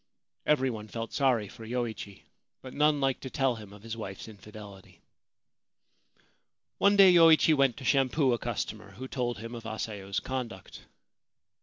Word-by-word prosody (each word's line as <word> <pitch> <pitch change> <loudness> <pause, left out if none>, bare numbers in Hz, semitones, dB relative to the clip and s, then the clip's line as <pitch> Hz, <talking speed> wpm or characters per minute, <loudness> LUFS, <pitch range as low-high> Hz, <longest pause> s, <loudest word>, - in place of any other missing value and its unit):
Every 135 -3 +2
one 110 -2 -7
felt 115 +1 -6
sorry 125 -7 +2
for 115 - -12
Yoichi; 110 -4 -5 0.4
but 130 - -9
none 150 0 +2
liked 135 -2 0
to 130 - -6
tell 135 -3 0
him 105 -2 -11
of 105 0 -14
his 115 0 -6
wife's 95 -3 -7
infidelity. 105 -2 -13 1.8
One 200 +1 +4
day 195 -2 +8
Yoichi 165 -2 +6
went 135 -4 +2
to 130 - -9
shampoo 135 0 +2
a 120 - -1
customer, 105 -3 -5
who 130 +7 -8
told 120 -3 -3
him 115 +2 -8
of 115 -1 -7
Asayo's 105 -3 -4
conduct. 120 -8 -6
120 Hz, 155 wpm, -29 LUFS, 105-135 Hz, 1.8 s, day